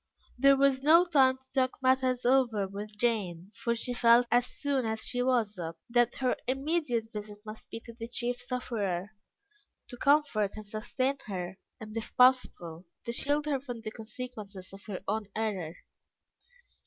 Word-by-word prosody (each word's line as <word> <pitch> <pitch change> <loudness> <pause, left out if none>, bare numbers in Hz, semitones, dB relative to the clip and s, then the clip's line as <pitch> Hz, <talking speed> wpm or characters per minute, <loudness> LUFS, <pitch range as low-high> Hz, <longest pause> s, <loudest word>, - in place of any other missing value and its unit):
There 275 +2 +5
was 270 -1 +3
no 325 +5 +6
time 265 -6 +4
to 260 0 -25
talk 260 -1 +1
matters 255 -1 +2
over 240 -6 +3
with 205 +2 -7
Jane, 200 -6 -1
for 235 -3 -1
she 245 +2 -2
felt, 240 0 +5
as 245 +1 +4
soon 280 -1 -1
as 220 -1 -2
she 245 - -1
was 235 -6 +1
up, 165 -1 -5
that 240 0 +3
her 255 -2 +1
immediate 265 -4 -1
visit 210 -1 -6
must 215 0 -9
be 225 - -6
to 235 - -11
the 230 0 -7
chief 245 +1 -3
sufferer, 210 -7 -2 0.8
to 245 - -8
comfort 280 -8 +2
and 215 - -7
sustain 255 +6 -2
her 190 -1 -5 0.2
and, 215 0 -9
if 225 0 -5
possible, 190 -10 +3 0.2
to 235 - -2
shield 290 +5 0
her 285 -3 0
from 245 -4 -7
the 215 - -5
consequences 215 -5 -8
of 195 - -11
her 195 -3 -5
own 215 +1 -1
error. 195 -7 -2
235 Hz, 165 wpm, -30 LUFS, 210-260 Hz, 0.8 s, no